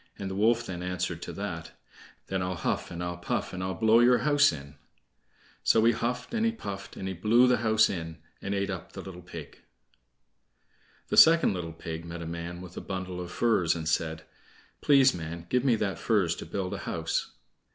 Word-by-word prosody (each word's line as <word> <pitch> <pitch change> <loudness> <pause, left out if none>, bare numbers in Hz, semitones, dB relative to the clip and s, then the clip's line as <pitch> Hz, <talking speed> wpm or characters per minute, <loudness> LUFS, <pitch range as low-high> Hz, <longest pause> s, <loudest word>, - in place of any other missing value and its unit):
The 95 -1 -4
wolf 115 +4 +2
then 90 -2 -5
answered 90 -1 -3
to - - -6
that: - - -5 0.5
"Then 95 -1 -2
I'll 90 0 -2
huff, - - -2
and 85 0 -5
I'll 85 0 -4
puff, 85 - -3
and 90 - -4
I'll 95 0 -2
blow 110 +1 +5
your 120 +1 +6
house 145 -1 +5
in." 70 -2 -9 0.9
So 110 0 +4
he 115 - +6
huffed, 120 - -3
and 230 -1 0
he 230 - +3
puffed, 100 - -7
and 95 - -4
he 95 - -2
blew 110 +7 +4
the 125 - +4
house 110 -1 +4
in, 80 -3 -5 0.2
and 100 0 -2
ate 100 0 -1
up 90 -4 -7
the - - -6
little 90 -2 -9
pig. 85 -4 -10 1.5
The - - -1
second 165 -7 +7
little 85 -3 -4
pig 80 0 -6
met 85 0 -7
a - - -6
man 85 +1 -6
with 90 -1 -11
a - - -4
bundle 95 -2 -5
of 90 - -6
furze 95 -9 +2
and 80 -2 -4
said: 80 -1 -1 0.6
"Please, 135 -2 +5
man, 85 0 -6
give 125 0 +2
me 130 -4 +4
that 105 -3 -2
furze 100 -8 +2
to - - -8
build 95 -2 -3
a - - -4
house." - - -2
95 Hz, 205 wpm, -28 LUFS, 85-115 Hz, 1.5 s, second